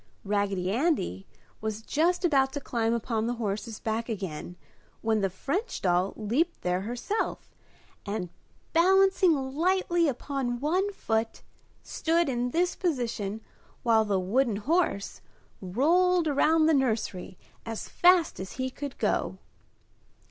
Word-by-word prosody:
Raggedy 200 -2 0
Andy 225 - 0 0.3
was 220 0 -4
just 345 +8 +1
about 270 -5 +3
to 285 - -2
climb 230 -4 -1
upon 230 -1 -1
the 245 - -1
horse's 215 0 -4
back 225 +2 -2
again 180 -5 -5 0.5
when 220 -1 +2
the 195 - +1
French 285 - -3
doll 180 +1 +1
leaped 255 +11 -1
there 180 +1 0
herself 245 - -3 0.5
and, 200 -3 -3 0.4
balancing 380 0 +5 0.2
lightly 345 +1 +2
upon 260 -2 -2
one 365 +9 +1
foot, 225 - -2 0.4
stood 330 -1 0
in 245 -1 -1
this 350 +6 +1
position 235 - -2 0.4
while 225 -2 +4
the 200 -3 0
wooden 225 +5 +1
horse 260 - 0 0.4
rolled 330 - +2
around 310 +2 +3
the 320 - +4
nursery 220 -9 -1 0.3
as 225 -1 -5
fast 355 -2 +4
as 190 0 -6
he 260 0 -3
could 280 +1 -7
go. - - 0
245 Hz, 125 wpm, -28 LUFS, 210-325 Hz, 0.5 s, balancing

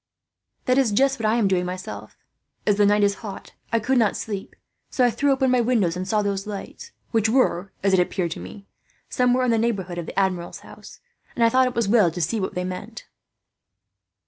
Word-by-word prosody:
"That 255 +1 +3
is 255 -5 +2
just 270 +5 +2
what 220 - 0
I 220 - +2
am 230 -4 +2
doing, 185 -2 +1
myself. 185 +1 -7 0.5
As 205 -1 +2
the 205 -1 +4
night 205 0 +3
is 200 0 +3
hot, 200 -4 -8 0.2
I 230 - +2
could 250 +3 +1
not 220 -3 +2
sleep; 200 -3 -6 0.3
so 255 - +2
I 245 - +3
threw 285 +4 +1
open 265 -1 +2
my 250 -1 +3
window, 225 -7 +2
and 185 +1 -4
saw 210 +1 +1
those 200 0 -2
lights, 210 - -8 0.2
which 225 -1 +2
were, 200 -7 +1
as 195 -1 +2
it 190 - +5
appeared 180 -1 0
to - - -5
me, 200 -1 -10 0.4
somewhere 250 0 +2
in 245 - +2
the 225 - +2
neighbourhood 190 -7 -2
of 170 - -6
the - - -2
Admiral's 185 -3 -2
house; - - -14 0.3
and 235 - +1
I 230 - +6
thought 255 +2 +3
it 250 - -4
was 235 -1 +1
as 200 - -1
well 215 -7 +5
to 170 +2 -7
see 175 +7 0
what 190 - -3
they 180 - -1
meant." 185 0 -7
210 Hz, 225 wpm, -23 LUFS, 190-240 Hz, 0.5 s, I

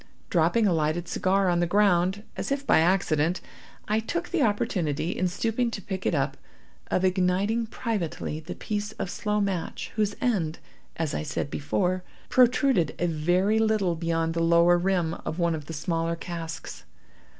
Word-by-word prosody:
Dropping 175 +7 +3
a 190 - +3
lighted 160 +2 0
cigar 190 +2 +1
on 175 -1 +2
the 175 - +2
ground, 190 0 +2
as - - -4
if 275 0 -1
by - - +5
accident, 170 -1 +2 0.5
I 215 +1 +2
took 340 +11 -3
the 350 -4 0
opportunity, 180 - 0
in 185 - +1
stooping 230 +6 0
to 230 - -5
pick 190 0 -4
it - - +1
up, 140 -1 0 0.5
of 185 - +1
igniting 190 +5 +1
privately 205 -9 -3
the 160 - -7
piece 210 -1 -3
of 180 - -4
slow 210 0 -1
match, 195 -4 -2
whose 210 -1 +1
end, 185 -11 0 0.4
as 160 -3 -2
I - - -1
said 145 -1 -3
before, 180 +4 -1 0.3
protruded 245 - +3
a 175 - 0
very 175 +6 +2
little 215 -5 +2
beyond 165 0 -1
the 165 - -1
lower 170 +1 +5
rim 175 -3 +1
of 160 - -4
one 170 -2 +1
of 150 -2 -5
the - - -6
smaller 165 +1 -1
casks. 165 -1 -7
180 Hz, 170 wpm, -26 LUFS, 165-210 Hz, 0.5 s, by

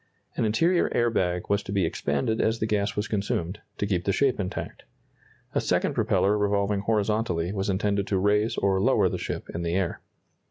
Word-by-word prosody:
An - - 0
interior 165 +12 +2
air 120 0 +2
bag 90 -4 0
was 100 0 +1
to 100 - -8
be 100 -3 +1
expanded 80 +8 -1
as 110 +1 +1
the 110 - -1
gas 105 -2 0
was 105 +1 -1
consumed, 100 -3 -2 0.2
to - - -1
keep 95 -4 0
the 100 - +2
shape 135 +3 +1
intact. 95 -2 -4 0.7
A - - +1
second - - +1
propeller 100 +2 +2
revolving 100 0 +1
horizontally 100 -4 0
was 95 -1 -2
intended 100 +1 0
to 100 - +1
raise 105 +3 +2
or 95 -1 +2
lower - - +3
the - - -4
ship - - -4
in 85 - -3
the 85 0 -1
air. 95 -3 -1
100 Hz, 195 wpm, -26 LUFS, 95-105 Hz, 0.7 s, lower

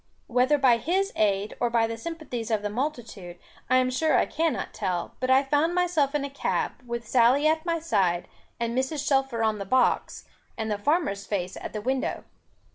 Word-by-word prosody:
Whether 255 +4 +2
by 260 -4 +4
his 375 - 0
aid, 205 -1 +1
or 240 - +1
by 230 -1 +2
the 230 0 -4
sympathies 250 -4 -6
of 215 -2 0
the 205 - -2
multitude, 230 - -4 0.3
I 255 - +5
am 255 0 +2
sure 310 +5 +2
I - - +3
cannot 325 -1 -2
tell, 185 -4 -3
but 255 - -2
I 265 +1 +5
found 295 +5 +1
myself 335 -6 +1
in 285 -1 0
a - - -5
cab, 280 - -1
with 235 -1 -5
Sally 255 +5 +4
at 315 +2 +2
my 335 0 +1
side, 185 - 0 0.3
and 235 0 -2
Mrs. 280 +3 -1
Shelfer 270 -4 +1
on 215 -1 +1
the - - -3
box, 255 +6 +1 0.3
and 220 -1 -3
the 205 - -1
farmer's 205 - 0
face 185 -3 -2
at - - -7
the 215 - -4
window. 260 +3 -2
255 Hz, 200 wpm, -26 LUFS, 220-295 Hz, 0.3 s, I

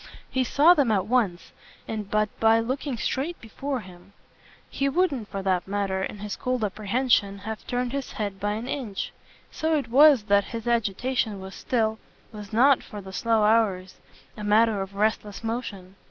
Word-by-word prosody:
He 260 -1 +1
saw 295 +7 +5
them 280 -9 +2
at 195 -3 +1
once 210 -7 0 0.4
and 210 -2 -4
but 215 0 +2
by 225 0 +5
looking 260 +2 -2
straight 285 +9 -2
before 260 +4 -4
him; 185 0 -15 0.5
he 275 0 -1
wouldn't 275 - 0
for 195 -1 -5
that 185 -2 0
matter, 195 -1 -1
in 200 - -4
his 205 0 -5
cold 250 -2 -2
apprehension, 210 0 +1
have 220 +2 -7
turned 245 0 -1
his 275 -1 -4
head 200 -2 -4
by 205 +2 -1
an 225 +3 -5
inch. 245 -8 -4 0.4
So 315 0 0
it 275 -6 -3
was 275 -1 +6
that 200 -1 +3
his 230 0 -6
agitation 230 -1 0
was 190 0 -9
still 220 -3 -1 0.3
was 210 -2 -9
not, 260 +4 +5
for 210 - -9
the 190 -1 -10
slow 225 +1 +2
hours, 210 -4 +2 0.4
a 210 - -8
matter 210 0 +3
of 195 +1 -6
restless 210 0 -1
motion. 205 -5 -5
220 Hz, 175 wpm, -25 LUFS, 200-250 Hz, 0.5 s, was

